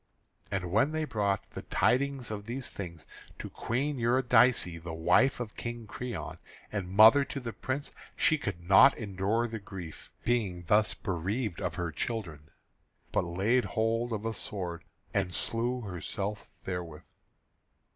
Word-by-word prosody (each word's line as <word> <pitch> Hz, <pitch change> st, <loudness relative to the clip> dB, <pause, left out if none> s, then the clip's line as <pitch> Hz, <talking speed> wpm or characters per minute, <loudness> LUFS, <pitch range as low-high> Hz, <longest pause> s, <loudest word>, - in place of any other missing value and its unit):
And 90 Hz, -3 st, -2 dB
when 125 Hz, +10 st, +3 dB
they 155 Hz, 0 st, 0 dB
brought 100 Hz, -7 st, -1 dB
the -, -, -6 dB
tidings 130 Hz, 0 st, +1 dB
of 105 Hz, 0 st, -5 dB
these 130 Hz, +2 st, -4 dB
things 85 Hz, -5 st, -7 dB, 0.3 s
to -, -, -7 dB
Queen 135 Hz, +4 st, -2 dB
Eurydice, 120 Hz, -7 st, +4 dB
the 85 Hz, 0 st, -6 dB
wife 90 Hz, +12 st, +3 dB
of 115 Hz, -3 st, -5 dB
King 120 Hz, -1 st, -5 dB
Creon 125 Hz, +2 st, -6 dB, 0.3 s
and 100 Hz, -4 st, -3 dB
mother 110 Hz, +8 st, +8 dB
to 140 Hz, -, -5 dB
the 120 Hz, -3 st, -5 dB
Prince, 130 Hz, +7 st, -3 dB, 0.2 s
she 155 Hz, -1 st, +3 dB
could 85 Hz, -7 st, -5 dB
not 95 Hz, +8 st, +7 dB
endure 105 Hz, +2 st, 0 dB
the 115 Hz, -1 st, -5 dB
grief, 95 Hz, -5 st, -9 dB
being 105 Hz, -7 st, 0 dB
thus 105 Hz, +5 st, +3 dB
bereaved 95 Hz, +3 st, -2 dB
of -, -, -2 dB
her 85 Hz, -2 st, -2 dB
children, 80 Hz, -6 st, -4 dB, 0.6 s
but -, -, +2 dB
laid 100 Hz, +9 st, +2 dB
hold 115 Hz, +1 st, 0 dB
of 110 Hz, -1 st, -3 dB
a 115 Hz, -, -1 dB
sword, 90 Hz, -6 st, -4 dB, 0.3 s
and 95 Hz, -3 st, 0 dB
slew 120 Hz, +2 st, -1 dB
herself 100 Hz, +1 st, -4 dB
therewith. 90 Hz, -4 st, -5 dB
110 Hz, 145 wpm, -30 LUFS, 90-120 Hz, 0.6 s, mother